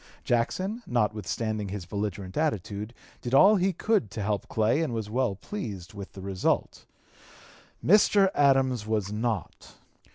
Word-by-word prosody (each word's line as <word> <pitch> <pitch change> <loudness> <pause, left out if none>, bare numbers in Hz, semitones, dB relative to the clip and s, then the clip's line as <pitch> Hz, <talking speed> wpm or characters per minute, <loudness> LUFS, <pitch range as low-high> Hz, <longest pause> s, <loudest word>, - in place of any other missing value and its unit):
Jackson, 185 - 0
notwithstanding 110 -2 -1
his 95 -2 -5
belligerent 100 -1 -4
attitude, 110 - -2 0.3
did 125 +2 -1
all 205 +9 +7
he 190 +1 +2
could 200 - 0
to 105 - -5
help 100 -2 -1
Clay 110 +7 +1
and 145 -8 -1
was 110 -2 -4
well 125 -4 0
pleased 100 - -6
with 100 -1 -9
the 95 - -9
result. 95 -1 -1 1.0
Mr. 200 +1 +5
Adams 135 -5 +3
was 105 -3 -1
not. 110 -3 -3
110 Hz, 135 wpm, -27 LUFS, 100-140 Hz, 1.0 s, all